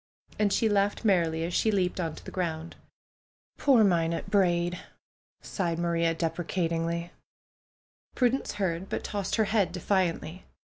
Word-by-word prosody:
" - - -26
And 210 -1 +3
she 225 - +2
laughed 205 +1 +1
merrily 165 -5 +2
as 170 +1 -3
she 220 - +2
leaped 185 -3 0
on 165 -3 -2
to - - -13
the - - -7
ground. 165 -2 -3 0.8
'^Poor 250 -6 +5
Minot 170 0 0
Braid 175 -3 +2 0.4
!" - - - 0.3
sighed 170 -4 -2
Maria, 170 -1 +1
deprecatingly. 170 0 -2 1.0
Prudence 255 +1 +1
heard, 190 -2 -2
but - - -3
tossed 200 -2 -2
her 220 - +2
head 200 -4 +1
defiantly. 180 -1 -1
180 Hz, 145 wpm, -28 LUFS, 165-200 Hz, 1.0 s, ^Poor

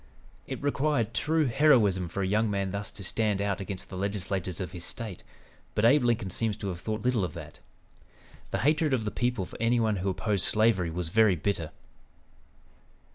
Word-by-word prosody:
It - - -5
required 145 -5 +1
true 155 +3 +1
heroism 115 - +4
for 100 +4 -3
a - - 0
young 110 +3 +2
man 100 -2 -1
thus 100 +1 -3
to 100 - -8
stand 105 +1 0
out 100 -1 -1
against 95 -1 -6
the - - -7
legislators 95 -2 -2
of 90 - -4
his 90 -2 -7
State, 105 -3 -4 0.5
but 105 - +2
Abe 135 +3 +5
Lincoln 115 -5 +1
seems 110 +1 -1
to 100 -2 -4
have 90 -2 -5
thought 110 +2 -3
little 125 -5 +2
of 90 - -4
that. 80 -3 -9 0.9
The - - -1
hatred 150 -1 +3
of 110 -4 -3
the 105 - -1
people 120 -5 -1
for 90 - -11
any 120 +1 +3
one 110 -3 +1
who 95 +2 -1
opposed 95 +1 -1
slavery 110 -6 +2
was 85 0 -3
very 110 0 +4
bitter. 85 -2 -2
105 Hz, 190 wpm, -28 LUFS, 95-115 Hz, 0.9 s, Abe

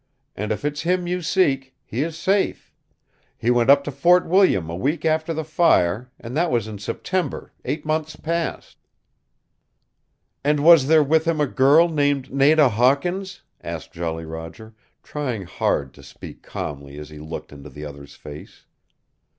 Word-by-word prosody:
And 105 +2 -3
if 110 - -3
it's 145 0 -2
him 180 +1 0
you 180 +1 -2
seek, 140 -7 0
he 125 +1 -3
is 160 +1 -3
safe. 195 +3 -1 0.6
He 120 - +1
went 120 0 +2
up 140 0 +6
to 145 - -4
Fort 175 +6 +4
William 180 - +3
a 85 - -5
week 145 - -2
after 160 +1 +1
the 160 0 -2
fire, 125 - +2
and 120 +3 -8
that 170 +2 +1
was 115 -5 0
in 105 -2 -7
September, 180 - -3
eight 150 - -3
months 155 0 -2
past." 170 0 -4 1.7
"And 145 0 +2
was 165 -5 +7
there 155 0 +5
with 160 +3 +2
him 165 -2 0
a 150 - +3
girl 140 +5 +4
named 145 -4 0
Nada 145 +2 +5
Hawkins?" 140 - 0 0.2
asked - - -6
Jolly 80 -1 -4
Roger, 80 +8 -9 0.3
trying 130 -9 -4
hard 70 -5 -1
to 70 - -16
speak 70 - -12
calmly 70 -1 -7
as 75 0 -9
he 75 - -10
looked 80 +2 -8
into 70 +1 -11
the 75 +3 -9
other's 70 -1 -11
face. 75 0 -12
140 Hz, 165 wpm, -22 LUFS, 95-160 Hz, 1.7 s, was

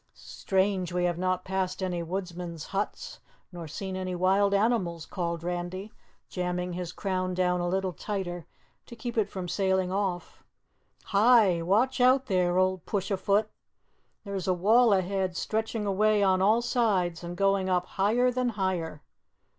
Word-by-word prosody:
"Strange 190 -1 -1
we 180 0 0
have 175 -1 0
not 185 0 -1
passed 190 0 -2
any 180 -2 -2
woodsmen's 175 -2 -5
huts, 200 +2 -3 0.3
nor 170 -2 -7
seen 190 +5 -5
any 185 -1 -3
wild 195 +3 +3
animals," 200 -6 +1
called 170 -3 -3
Randy, 180 +3 -4 0.4
jamming 180 0 -3
his 175 -1 -4
crown 185 -2 -2
down 180 -1 +1
a 175 - -1
little 190 0 -1
tighter 175 -2 -4 0.4
to 235 - -10
keep 235 +1 -5
it 220 -3 +1
from 185 -2 -5
sailing 190 0 0
off. 190 -2 -3 0.6
"Hi! 205 -4 +4
Watch 220 +10 +1
out, 260 +2 +5
there 180 -5 +1
old 185 -2 +1
Push 195 -1 -2
a 195 - +1
Foot! 205 +3 +1 0.7
There's 200 -3 -4
a 185 - +2
wall 220 +6 +4
ahead 190 -1 0
stretching 220 0 -2
away 210 +1 +2
on 190 -1 +3
all 220 +5 +3
sides 195 -9 0
and 175 +1 -6
going 195 -1 +2
up 180 -1 +1
higher 230 +8 +1
than 250 0 0
higher. 175 -6 -2
190 Hz, 155 wpm, -28 LUFS, 180-205 Hz, 0.7 s, out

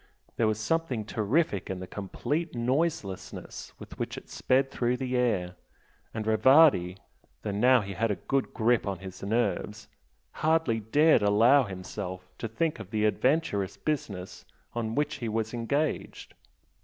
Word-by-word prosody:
There 115 - +2
was 110 0 0
something 130 -2 -1
terrific 110 - 0
in 95 -1 -3
the 95 - -6
complete 140 - -3
noiselessness 125 - -2
with - - -12
which - - -3
it - - -11
sped 135 +1 +1
through 125 +1 0
the 130 -1 -2
air, 105 -8 +1 0.6
and 110 -1 -4
Rivardi, 110 - +5 0.5
though 105 - -2
now 125 +5 +4
he 100 -1 -6
had 115 +4 0
a 105 - 0
good 135 +9 -1
grip 115 -1 +1
on 100 -1 -2
his 95 0 -10
nerves, 110 +1 -1 0.5
hardly 155 -7 +2
dared 150 +9 +4
allow 115 +7 +5
himself 95 -1 -6
to - - -3
think 150 +8 -1
of 105 -4 -8
the 105 0 0
adventurous 105 - +1
business 100 -12 -4 0.3
on 115 -1 -3
which 150 0 0
he 120 -5 -4
was 110 +1 -2
engaged. 140 +6 -2
115 Hz, 150 wpm, -28 LUFS, 100-135 Hz, 0.6 s, Rivardi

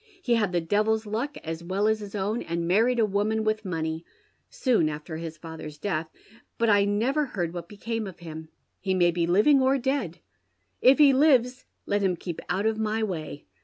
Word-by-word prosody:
He 255 -10 0
had 215 -5 +2
tlie 170 -2 -1
devil's 215 +3 +1
luck 235 +8 -3
as 165 +1 -5
well 190 +4 0
as 220 0 +2
his 205 -1 -8
own, 210 +4 -1
and 170 0 -3
manied 225 +7 +3
a 225 - +4
woman 210 +2 0
with 215 0 0
money, 160 -3 -3 0.5
soon 230 - +1
after 155 +2 -6
his 165 0 -7
father's 160 -2 -9
death, 160 -2 -2 0.5
but 230 -1 +3
I 205 -1 +4
never 240 +9 +1
heard 175 -8 -3
wliat 170 -1 -6
became 220 +2 -4
of 185 - -9
him. 160 -2 -9 0.3
He 190 -2 -1
may 175 -1 +4
be 170 0 0
living 215 +11 +5
or 265 +1 +3
dead. 260 - -2 0.6
If 260 +2 +6
he 290 -2 +7
lives 260 -3 +3 0.2
let 205 0 0
him 190 -2 +1
keep 170 -1 -6
out 200 +3 0
of 220 0 +1
my 220 0 0
way. 160 -7 -5
205 Hz, 200 wpm, -26 LUFS, 170-225 Hz, 0.6 s, he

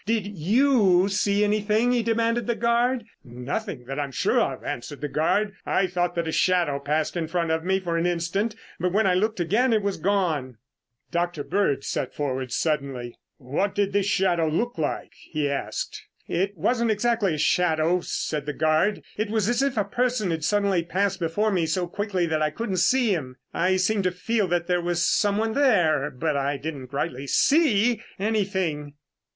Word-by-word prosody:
Did 220 -3 +1
you 200 - +3
see 200 +1 +1
anything?" 215 +3 +2
he 245 -1 +2
demanded 230 +1 0
of - - -12
the 235 - +1
guard. 235 +1 +1 0.2
"Nothing 125 - -5
that 135 +3 -5
I - - +1
am 140 - -6
sure - - +1
of," - - -1
answered 140 +4 -5
the 150 - -3
guard. 200 +8 +1
"I 195 - +1
thought 175 -1 -1
that 170 -1 -1
a - - -1
shadow 170 -6 +2
passed 150 +4 -1
in 165 -2 -2
front 170 -1 -1
of 160 0 0
me 190 +2 +1
for 170 -3 -2
an 170 - +1
instant, 180 +6 -1 0.2
but 180 +1 0
when 215 +1 +3
I 185 - +3
looked 215 +3 0
again, 215 +9 +2
it 215 -2 +2
was 200 -1 -1
gone." 165 - 0 0.5
Dr. 170 -3 -1
Bird 160 -8 0
sat 130 - -3
forward 130 -3 -3
suddenly. 135 -5 -2 0.2
"What 150 +10 -2
did 200 -1 0
this 200 -1 +1
shadow 185 -5 +2
look 195 +6 -1
like?" 150 - -3
he 150 -2 -3
asked. 140 0 -3 0.3
"It 195 +2 -1
wasn't 235 +7 +1
exactly 215 -4 +1
a - - -5
shadow," 170 +1 +2
said 150 -1 -3
the 150 - -2
guard. 155 +8 +1
"It 215 0 -1
was 215 -2 0
as 240 +2 +1
if 275 -3 0
a 210 - +3
person 240 -5 0
had 165 - -1
passed 150 - -1
suddenly 200 -5 +1 0.3
before 195 +6 0
me 175 -4 +1
so 175 +3 0
quickly 190 0 -2
that 160 -2 -1
I 155 - +2
couldn't 190 +4 -3
see 225 +5 +3
him. 130 -7 -4 0.2
I 185 +2 +2
seemed 190 +1 +1
to 185 - +2
feel 205 +3 -1
that 175 -1 0
there 180 -1 +1
was 175 0 0
someone 210 +4 +1
there, 175 - +3
but 135 +1 -2
I 140 +1 0
didn't 140 -3 -6
rightly 140 -1 -3
see 240 - +3 0.2
anything." 190 -8 -1
180 Hz, 190 wpm, -25 LUFS, 155-210 Hz, 0.5 s, you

